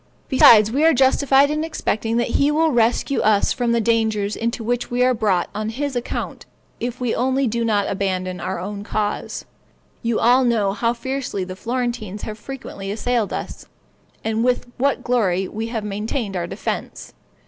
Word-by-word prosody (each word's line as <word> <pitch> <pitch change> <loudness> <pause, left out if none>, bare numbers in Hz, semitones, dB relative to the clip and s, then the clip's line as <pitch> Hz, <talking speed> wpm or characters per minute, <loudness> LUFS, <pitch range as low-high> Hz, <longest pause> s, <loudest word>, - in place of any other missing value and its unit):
Besides, 220 -5 +7
we 280 +5 +1
are 325 -2 +5
justified 270 +2 +4
in 305 +1 -1
expecting 230 -8 -1
that 240 - 0
he 280 - +4
will 315 +1 +2
rescue 240 +3 +2
us 210 -1 +3
from 240 -2 0
the 235 - +2
dangers 220 -2 +1
into 230 0 -2
which 245 +2 -1
we 245 +1 +1
are 255 0 +4
brought 200 -6 +1
on 215 +1 -3
his 275 +4 -3
account, 245 - -4 0.3
if 245 +1 -4
we 245 -3 0
only 265 +2 +1
do 235 0 -1
not 210 -3 +1
abandon 185 -2 -2
our 190 -1 -3
own 200 +2 -5
cause. 210 0 -3 0.6
You 230 -2 0
all 250 +3 +5
know 220 -5 +2
how 230 +3 0
fiercely 255 -5 -3
the 185 0 -7
Florentines 235 -2 -3
have 215 0 -6
frequently 210 -6 -7
assailed 225 +1 -1
us, - - -6 0.6
and 225 +1 0
with 250 0 +1
what 275 0 +1
glory 195 -7 +1
we 220 +3 -4
have 230 -2 -3
maintained 210 +1 -3
our 175 -1 -2
defense. - - -5
230 Hz, 175 wpm, -21 LUFS, 210-250 Hz, 0.6 s, Besides